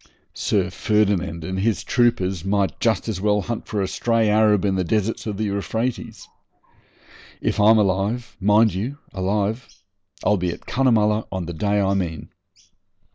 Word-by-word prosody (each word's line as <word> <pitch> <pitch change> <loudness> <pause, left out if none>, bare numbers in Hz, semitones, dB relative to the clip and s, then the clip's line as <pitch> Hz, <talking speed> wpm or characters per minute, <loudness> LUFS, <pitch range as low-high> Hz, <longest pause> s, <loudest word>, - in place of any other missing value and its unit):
Sir 95 -3 0
Ferdinand 95 -5 0
and 95 +4 -3
his 110 +2 0
troopers 95 -8 +1
might 95 -3 0
just - - +1
as 90 - -3
well 105 0 +2
hunt 120 +1 -5
for 105 -2 -1
a - - -1
stray 115 +2 +1
Arab 105 -2 +3
in 100 - +1
the 95 -1 0
deserts 110 +5 -1
of 105 -2 -3
the 110 - -2
Euphrates. 110 +4 -3 1.1
If - - -1
I'm 110 +2 +6
alive 105 +3 0
mind 105 +3 +4
you, 115 +10 -4 0.2
alive 100 +4 -1 0.6
I'll 105 - +3
be 90 -1 -1
at 85 - -7
Cunnamulla 110 -5 +2
on 95 -2 -3
the 85 - -6
day 105 +4 0
I 100 -1 +1
mean. 90 -5 -3
105 Hz, 160 wpm, -22 LUFS, 95-110 Hz, 1.1 s, I'm